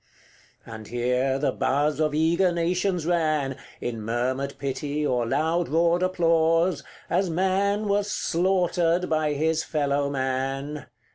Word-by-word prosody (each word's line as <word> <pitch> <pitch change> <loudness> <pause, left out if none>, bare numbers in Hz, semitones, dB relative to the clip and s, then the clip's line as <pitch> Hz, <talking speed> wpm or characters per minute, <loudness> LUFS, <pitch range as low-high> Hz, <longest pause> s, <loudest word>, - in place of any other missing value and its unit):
CXXXIX. - - -10
And 110 -1 -9
here 125 +2 0
the 140 - 0
buzz 145 +2 0
of 155 -1 +1
eager 170 +4 +2
nations 175 0 0
ran, 155 -6 0 0.2
In 115 -2 -4
murmured 130 +5 -2
pity, 145 +2 -3
or 125 -4 0
loud 160 +7 0
roared 170 +3 +2
applause, 165 -1 +2 0.2
As 190 -1 +1
man 195 +4 +1
was 205 0 0
slaughtered 175 -2 +1
by 155 -1 +1
his 160 +2 0
fellow 145 -2 0
man. 135 +2 -3
155 Hz, 130 wpm, -25 LUFS, 135-175 Hz, 0.2 s, eager